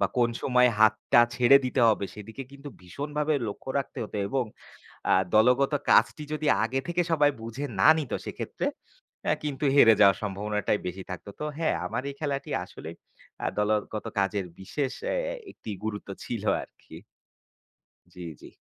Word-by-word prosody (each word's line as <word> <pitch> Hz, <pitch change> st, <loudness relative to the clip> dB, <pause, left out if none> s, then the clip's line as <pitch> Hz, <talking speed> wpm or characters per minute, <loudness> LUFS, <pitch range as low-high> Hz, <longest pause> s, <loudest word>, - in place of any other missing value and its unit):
বা -, -, +4 dB
কোন 120 Hz, -1 st, +3 dB
সময় 125 Hz, -1 st, +4 dB
হাতটা 110 Hz, +2 st, +5 dB
ছেড়ে 125 Hz, +2 st, +6 dB
দিতে 125 Hz, 0 st, 0 dB
হবে, 105 Hz, -2 st, +2 dB
সেদিকে 110 Hz, +5 st, -8 dB
কিন্তু 140 Hz, +1 st, -10 dB
ভীষণভাবে 150 Hz, -, -2 dB
লক্ষ্য 120 Hz, +5 st, -7 dB
রাখতে 135 Hz, -, -5 dB
হতো 105 Hz, -, -7 dB
এবং 135 Hz, -2 st, 0 dB, 0.7 s
আ -, -, +6 dB, 0.2 s
দলগত 125 Hz, +6 st, +4 dB, 0.2 s
কাজটি 150 Hz, -, +4 dB
যদি 155 Hz, 0 st, -2 dB, 0.2 s
আগে 130 Hz, +4 st, 0 dB
থেকে 175 Hz, +1 st, +1 dB
সবাই 145 Hz, -2 st, +4 dB
বুঝে 115 Hz, +6 st, -5 dB
না -, -, +6 dB
নিত, 150 Hz, -6 st, -4 dB
সেক্ষেত্রে -, -, -4 dB, 0.6 s
অ্যা -, -, +2 dB
কিন্তু 145 Hz, 0 st, -3 dB
হেরে 115 Hz, -5 st, +8 dB
যাওয়ার 100 Hz, -2 st, +7 dB
সম্ভাবনাটাই 105 Hz, +1 st, -1 dB
বেশি 90 Hz, +2 st, -5 dB
থাকত। 90 Hz, +2 st, -7 dB
তো -, -, -2 dB
হ্যাঁ, 165 Hz, -, +1 dB
আমার 125 Hz, -, -3 dB
এই -, -, -9 dB
খেলাটি 140 Hz, -3 st, -3 dB
আসলেই 80 Hz, +2 st, -10 dB, 0.5 s
আ -, -, +1 dB
দলগত 105 Hz, 0 st, 0 dB
কাজের 100 Hz, -1 st, 0 dB
বিশেষ 130 Hz, +7 st, -3 dB
অ্যা -, -, -1 dB
অ্যা -, -, -3 dB, 0.2 s
একটি 110 Hz, -, -9 dB
গুরুত্ব 105 Hz, -2 st, -4 dB, 0.2 s
ছিল 115 Hz, -4 st, -4 dB, 0.2 s
আরকি। -, -, -14 dB, 1.2 s
জি, 90 Hz, -, -13 dB, 0.2 s
জি। -, -, -12 dB
120 Hz, 160 wpm, -27 LUFS, 105-140 Hz, 1.2 s, হেরে